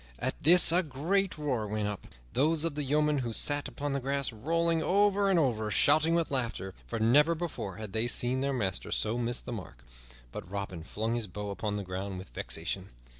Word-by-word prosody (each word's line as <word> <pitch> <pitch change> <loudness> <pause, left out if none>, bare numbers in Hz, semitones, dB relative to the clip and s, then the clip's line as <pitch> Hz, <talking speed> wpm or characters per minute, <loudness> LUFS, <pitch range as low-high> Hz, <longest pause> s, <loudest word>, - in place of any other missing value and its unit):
At - - -4
this 170 +2 +8
a 175 +2 +4
great 170 +5 -1
roar 130 -8 -2
went 105 0 -2
up, 105 -2 -6 0.3
those 155 +3 +2
of 165 -2 0
the 150 - -3
yeomen 150 +1 +1
who 120 -3 -3
sat 145 +5 +2
upon 145 0 -4
the 140 - -1
grass 140 -1 -1
rolling 165 +8 0
over 200 +2 +2
and 190 - +3
over 120 -9 +1
and 105 - -3
shouting 155 +3 +4
with 165 -3 0
laughter, 115 -7 -2
for 115 - -4
never 145 +9 +4
before 160 - -5
had 105 -1 -8
they 110 +2 0
seen 125 +2 +3
their 140 0 0
master 100 -8 -3
so 110 +1 -1
miss 120 +1 -2
his - - -7
mark; 90 - -9 0.5
but 90 - -8
Robin 100 -3 -5
flung 110 +6 -3
his 120 -3 -2
bow 105 +2 -6
upon 105 +1 -3
the 100 - -3
ground 95 +1 -5
with 95 +1 -9
vexation. 90 +3 -3
125 Hz, 210 wpm, -29 LUFS, 105-155 Hz, 0.5 s, this